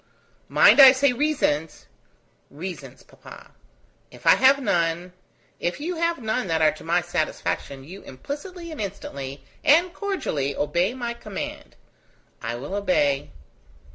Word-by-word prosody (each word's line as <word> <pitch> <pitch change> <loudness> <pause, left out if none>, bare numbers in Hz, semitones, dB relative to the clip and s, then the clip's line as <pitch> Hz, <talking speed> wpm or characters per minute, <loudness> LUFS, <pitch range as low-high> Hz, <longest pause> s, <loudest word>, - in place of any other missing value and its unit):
"Mind, - - +6
I 265 -1 +10
say 270 0 +2
reasons." 245 - -1 0.6
"Reasons, 150 -5 -8
papa. - - -15 0.6
If - - -16
I - - +8
have 270 +1 +5
none.. 175 -6 -1 0.2
." - - -38
"If 175 - -10
you 335 +4 -4
have 335 0 0
none 220 -2 -2
that 165 -1 0
are 155 -1 +4
to 155 - -12
my 170 +2 +1
satisfaction, 155 -4 -3
you 185 +8 -11
implicitly 335 - -8
and 310 - -6
instantly, 140 -9 -6 0.2
and 340 +4 +4
cordially 155 - -2
obey 175 - 0
my 240 -2 -4
command." 215 -4 -7 0.7
"I 115 +1 -4
will 140 +9 -7
obey." 145 -8 +1
185 Hz, 140 wpm, -24 LUFS, -, 0.7 s, I